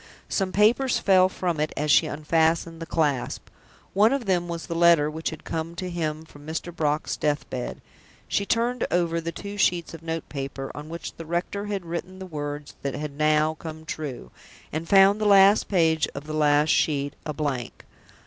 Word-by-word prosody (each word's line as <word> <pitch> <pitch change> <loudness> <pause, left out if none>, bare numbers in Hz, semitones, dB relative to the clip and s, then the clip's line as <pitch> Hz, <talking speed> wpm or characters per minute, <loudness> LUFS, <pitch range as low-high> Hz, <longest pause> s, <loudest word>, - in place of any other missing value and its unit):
Some 190 -2 0
papers 230 +7 +3
fell 185 -1 +4
from 175 -4 -2
it 155 - 0
as 150 +1 +1
she - - +5
unfastened 160 +2 0
the 165 - -5
clasp. 145 -6 -1 0.4
One 210 +4 +5
of 275 -3 -1
them 180 -3 +1
was 170 -1 -5
the 170 - -4
letter 165 -3 +4
which 160 +1 -3
had 160 - -9
come 165 +1 -4
to 180 0 -4
him 160 -2 -3
from 145 -2 -15
Mr. 160 +2 -5
Brock's 150 -1 0
death 150 0 -1
bed. 125 -2 -4 0.5
She 200 - 0
turned 235 +3 0
over 170 -1 +1
the 165 +1 -4
two 205 +3 -7
sheets 175 -3 +1
of 165 - -9
note 165 0 -4
paper 135 -1 -5
on 150 +1 -8
which 170 -1 -7
the 165 - -7
rector 180 +4 -2
had 200 -3 -3
written 175 +2 -5
the 190 - -7
words 145 -3 -5
that 140 -1 -3
had 150 0 -4
now 155 +1 +3
come 160 -1 -8
true, 140 - -6 0.4
and 160 +2 -4
found 195 +2 +6
the - - +1
last 200 +1 +6
page 160 -4 +2
of 140 +1 -6
the 155 - -6
last 150 0 +3
sheet 145 -2 +1
a 155 - -3
blank. 145 -5 -4
165 Hz, 195 wpm, -25 LUFS, 150-185 Hz, 0.5 s, found